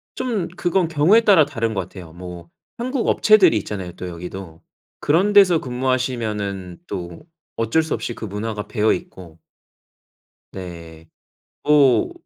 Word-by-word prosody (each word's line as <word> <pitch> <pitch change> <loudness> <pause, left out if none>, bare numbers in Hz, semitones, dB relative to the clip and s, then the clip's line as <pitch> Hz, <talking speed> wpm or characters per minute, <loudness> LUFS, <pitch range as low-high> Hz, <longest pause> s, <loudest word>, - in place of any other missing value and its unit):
좀 215 -9 -2
그건 175 -1 +1
경우에 165 +8 +4
따라 195 -8 +6
다른 115 -6 -3
것 95 - -1
같아요. 90 -2 -10
뭐 90 -1 -10 0.3
한국 250 +1 -2
업체들이 210 - +5
있잖아요 95 -3 -6
또 90 +1 -7
여기도. 90 -1 -9 0.4
그런 180 +8 +2
데서 190 -5 +6
근무하시면은 115 -8 -2
또 85 -4 -6 0.4
어쩔 115 +8 +1
수 160 - -3
없이 120 - -4
그 115 - -8
문화가 105 +1 -4
배어 105 0 +2
있고. 90 - -8 1.1
네. 85 -3 -10 0.5
뭐 150 - +4
115 Hz, 270 characters per minute, -21 LUFS, -, 1.1 s, 따라